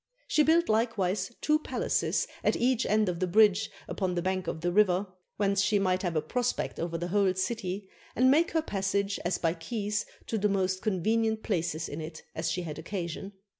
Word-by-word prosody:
She 305 - +3
built 330 +3 +4
likewise 210 -3 0
two 305 0 +3
palaces - - 0 0.2
at - - +3
each 250 0 +1
end 215 0 +3
of 175 -2 -2
the 185 - 0
bridge 210 +2 +4 0.2
upon 185 -2 -2
the 175 - -1
bank 185 -1 -1
of 160 - -3
the 175 +1 0
river, 190 -1 +3 0.3
whence 200 -1 +2
she 205 +2 +3
might 185 -2 +1
have 175 -3 -2
a 155 - +1
prospect 245 +9 -2
over 170 0 -2
the 175 +1 -4
whole 195 -1 +2
city, 190 0 -3 0.3
and 255 +2 +5
make 325 +4 +4
her 320 -1 0
passage 200 -2 -1
as 175 0 0
by 165 -1 +1
keys 210 +5 -3 0.2
to 225 - -2
the 210 +1 +2
most 190 -1 0
conven 220 +2 +1
ient 220 0 -2
places 165 -5 -1
in 150 +3 -6
it 155 0 -8
as 160 0 -2
she 180 +3 -2
had 155 -2 -6
occasion. 180 +2 -5
195 Hz, 205 wpm, -29 LUFS, 175-220 Hz, 0.3 s, and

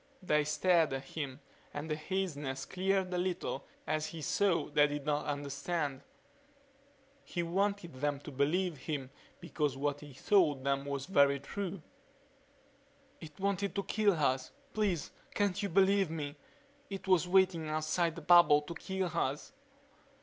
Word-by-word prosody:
They 150 -4 +3
stared 160 0 +3
at 135 0 -3
him 140 -1 -6 0.3
and 145 +2 -4
the 155 - -1
haziness 150 -6 -3
cleared 190 0 0
a 180 - 0
little 180 -6 -2 0.2
as 155 0 -1
he 160 -2 -7
saw 195 0 +2
they 145 0 +4
did 145 -1 -4
not 150 0 0
understand. 145 0 -2 1.2
He 175 - -3
wanted 195 0 -1
them 145 +2 -1
to 150 - -8
believe 155 +5 +1
him 135 -2 -4 0.3
because 145 -4 -2
what 145 +1 -1
he 145 -3 -12
told 150 -7 +3
them 140 0 0
was 140 -1 -3
so 190 - -11
very 140 -3 +5
true. 185 +4 -5 1.4
"It 155 0 -11
wanted 200 0 -1
to 200 - 0
kill 210 -1 +2
us. 135 -5 0 0.2
Please 200 -7 0 0.2
can't 200 -1 +1
you 200 - -1
believe 195 0 +4
me? 150 -3 -4 0.5
It 195 -1 -6
was 180 -2 +4
waiting 180 -4 +3
outside 155 +2 0
the 170 - -8
bubble 170 -3 +7
to 160 - -6
kill 190 +1 -3
us." 140 - -2
155 Hz, 150 wpm, -33 LUFS, 145-185 Hz, 1.4 s, bubble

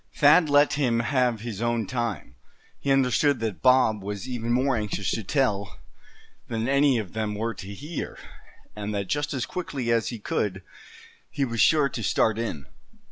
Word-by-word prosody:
Thad 150 +2 +5
let 145 +1 +4
him 125 -5 +1
have 125 -3 +1
his 115 -3 -6
own 120 -2 0
time. 120 - -3 0.5
He 140 - -1
understood 135 +1 +3
that 110 -4 -3
Bob 125 -5 +4
was 100 +4 -5
even 120 -2 -3
more 130 +2 +2
anxious 105 -3 -2
to 110 - -2
tell, 105 -5 -1 0.7
than 115 0 -2
any 140 -1 +3
of 105 -6 -5
them 110 -1 -2
were 115 +2 -2
to 100 -2 -9
hear; 145 +10 -6 0.6
and 105 0 -4
that 100 -1 -1
just 145 +8 -2
as 130 -4 -2
quickly 135 -9 -3
as 115 -1 +2
he 120 - -4
could, 100 -2 -2 0.7
he 140 - -1
was 115 -3 -1
sure 150 +2 +5
to 120 - -5
start 110 +2 +1
in. 80 -12 -4
115 Hz, 175 wpm, -25 LUFS, 105-135 Hz, 0.7 s, Thad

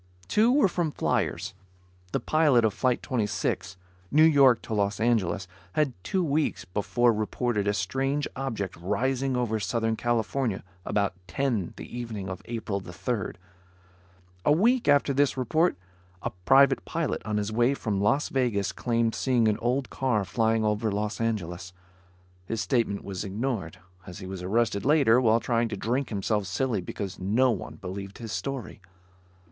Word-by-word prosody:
Two 220 - +4
were 275 -4 +5
from 170 -3 -1
fliers. - - -1 0.6
The - - 0
pilot 150 -7 +3
of 110 - +1
Flight 125 +2 0
26, 105 -4 -2 0.3
New 155 +2 +5
York 140 -6 +6
to - - -5
Los 100 -1 0
Angeles, 105 -5 +1 0.3
had 145 0 +1
two 190 -1 0
weeks 150 -1 0
before 115 +6 +1
reported 110 0 -1
a 100 - +2
strange 135 +10 -1
object 115 -8 -3
rising 130 +8 0
over 115 -3 0
Southern 110 +3 0
California 120 -1 -1 0.2
about 100 -2 0
ten 120 -9 -1
the - - -7
evening 110 -6 -5
of 95 - -6
April 110 -4 -3
3rd. 95 +6 -3 1.1
A - - +3
week 230 +11 +3
after 145 -1 +4
this 140 0 +2
report, 155 - +2 0.5
a - - -2
private 135 +3 +5
pilot 165 -3 -2
on 105 -1 -2
his 105 +1 -1
way 120 +5 +2
from 105 -7 -2
Las 115 +8 +2
Vegas 120 -7 0
claimed 115 -2 0
seeing 125 -4 +2
an 105 - +1
old 125 +3 -1
car 120 -7 0
flying 110 +3 +1
over 105 +1 0
Los 105 +2 -2
Angeles. 90 -5 -3 0.7
His 115 - -2
statement 115 -6 0
was 95 -1 -5
ignored, 105 -4 -3 0.3
as 90 - -8
he 95 - -8
was 95 -1 -6
arrested 105 +2 0
later 135 -5 +5
while 115 -1 +4
trying 115 0 +1
to 110 -2 -5
drink 125 +7 -1
himself 105 -1 -1
silly 105 +3 -1
because 95 +1 -6
no 115 +8 +3
one 105 - -5
believed 100 0 -7
his 115 -2 -7
story. 135 -6 -4
115 Hz, 155 wpm, -27 LUFS, 100-130 Hz, 1.1 s, York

